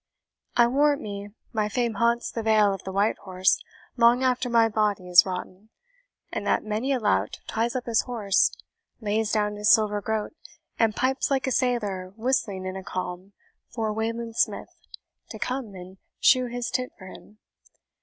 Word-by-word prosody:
I 240 - +7
warrant 285 +4 +2
me, 200 -1 -6 0.2
my 215 -2 0
fame 235 +1 0
haunts 235 +3 +1
the 230 - -3
Vale 215 -2 +3
of 195 - -6
the 190 - -4
Whitehorse 190 -2 +1 0.4
long 240 +2 +5
after 255 -1 +1
my 230 -1 +4
body 210 -4 0
is 180 +1 +7
rotten; 185 +3 -6 0.6
and - - -4
that - - +2
many 220 +5 -2
a 265 - +1
lout 100 - 0
ties 230 +2 -1
up 250 - -2
his 230 -2 +2
horse, 215 -6 +1 0.5
lays 215 -1 -1
down 210 -1 0
his 210 0 +1
silver 210 -2 +4
groat, 220 +5 -2 0.5
and 225 -2 +2
pipes 260 +1 0
like 270 -2 +1
a 260 - -1
sailor 210 -8 -1
whistling 220 -5 -1
in 185 0 -4
a 190 - -6
calm 185 +2 -5 0.4
for 220 -3 -2
Wayland 230 +1 -3
Smith - - -1 0.5
to - - -7
come 250 -6 -4
and 185 +1 -11 0.2
shoe 255 -1 +4
his 240 -1 -4
tit 255 0 -2
for 185 - -12
him. 210 +2 -13
220 Hz, 170 wpm, -25 LUFS, 200-240 Hz, 0.6 s, I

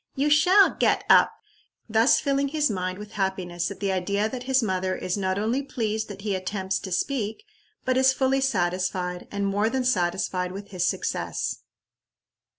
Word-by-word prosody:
you 285 +2 +1
shall 365 +7 +6
get - - +2
up;" - - +6 0.6
thus 225 +3 +4
filling 280 -1 0
his 295 -3 0
mind 185 -1 -3
with 210 0 -9
happiness 185 -3 -2
at 200 -2 -8
the 200 -1 -1
idea 200 +3 0
that 250 +2 -6
his 265 -2 +3
mother 185 -2 -1
is 180 - -2
not 190 -1 -1
only 225 +6 0
pleased 220 -5 -3
that 200 -1 -9
he 210 -2 -1
attempts 190 0 -2
to 190 - -8
speak, 220 - -2 0.4
but 255 0 +1
is 265 0 +5
fully 265 0 +1
satisfied, 180 -5 -1
and 200 0 -2
more 205 +2 +1
than 260 +1 -1
satisfied, 180 -4 0
with 200 +1 -8
his 180 -2 -1
success. - - -2
205 Hz, 170 wpm, -25 LUFS, 185-255 Hz, 0.6 s, shall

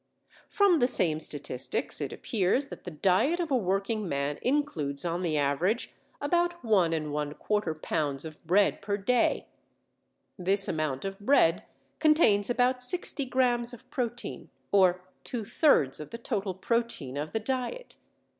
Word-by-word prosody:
From 395 -5 +4
the 245 - +4
same 170 -10 +3
statistics 140 -5 -1
it - - -3
appears 230 +6 0
that - - -10
the - - -4
diet 190 - +2
of 335 -4 -2
a - - +4
working 195 -1 -1
man 140 0 -2
includes 175 - -1
on 170 +1 -1
the 165 -4 0
average 155 - 0 0.3
about 345 +4 0
1¼ 200 -7 +3 0.2
lb. 150 -1 -2
of 155 -1 -10
bread 195 +5 +2
per 200 0 -2
day. 240 +5 +1 0.9
This 195 +2 +1
amount 155 -1 -2
of 195 0 -5
bread 205 -7 +3 0.3
contains 300 -11 +4
about 250 +1 +2
60 280 +1 0
grams 245 -2 +1
of 230 - -19
protein, 240 -2 -4 0.2
or 185 -2 +4 0.2
two 230 -4 -4
thirds 200 - +3
of 150 - -8
the 230 - -7
total 205 -5 -3
protein 210 - -1
of 150 +2 -4
the 220 - -1
diet. 260 - -4
200 Hz, 145 wpm, -28 LUFS, 160-250 Hz, 0.9 s, From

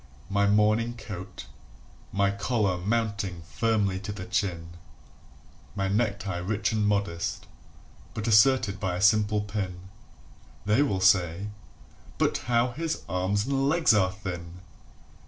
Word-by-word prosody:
"] 70 - -24
My 100 - +4
morning 110 +3 +2
coat, 95 -4 -8 0.7
my 100 0 +2
collar 100 -2 0
mounting 105 -4 -2
firmly 105 -3 0
to 105 +1 -6
the 95 -3 -6
chin, 85 -5 -2 1.1
My 95 -2 -1
necktie 100 -3 -1
rich 105 +6 -1
and 105 -2 +1
modest, 100 -5 -1 0.7
but 110 +1 -3
asserted 110 -2 +4
by 95 -3 -1
a 90 - -4
simple 105 0 +4
pin 95 -3 -5 0.8
[They 105 +6 +3
will 100 -10 0
say: 95 0 +3 0.7
"But - - +1
how 120 +1 +2
his 160 +5 -3
arms 95 +3 0
and 135 +1 +1
legs 160 -6 +4
are 95 -3 +3
thin!" 90 -4 -7
100 Hz, 130 wpm, -27 LUFS, 95-110 Hz, 1.1 s, My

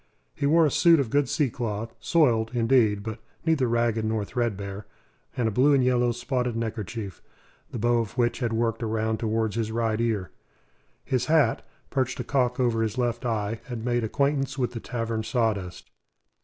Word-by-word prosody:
He 140 - -1
wore 165 +2 +5
a 150 - +1
suit 165 +2 +5
of 125 -5 -1
good 145 -1 +2
sea 145 -6 +1
cloth 115 -1 -4
soiled, 120 -9 +2
indeed, 115 -4 +3
but 110 +1 -5 0.3
neither 155 -6 +2
ragged 115 -1 +1
nor 110 -1 -1
threadbare 100 -4 -3 0.5
and 120 -3 +1
a - - 0
blue 135 +7 +4
and 135 - +3
yellow 125 -1 +2
spotted 125 0 -2
neckerchief, 110 -3 -4 0.5
the - - -6
bow 120 +1 +2
of 115 +1 -4
which 120 -1 +1
had 120 -3 -1
worked 115 +1 0
around 110 0 -1
towards 110 -1 -1
his 110 -1 -1
right 115 -1 0
ear. 105 -8 -1 0.7
His 130 -2 0
hat, 155 -7 +3 0.3
perched 130 -3 -1
a - - -1
cock 125 -1 0
over 120 -3 +2
his 110 +1 -1
left 120 0 -1
eye, 110 -1 -2
had 120 -2 -6
made 120 -1 +1
acquaintance 140 +3 0
with 125 -3 0
the 120 - -5
tavern 115 -2 -3
sawdust. 110 -5 -2
115 Hz, 180 wpm, -26 LUFS, 110-125 Hz, 0.7 s, wore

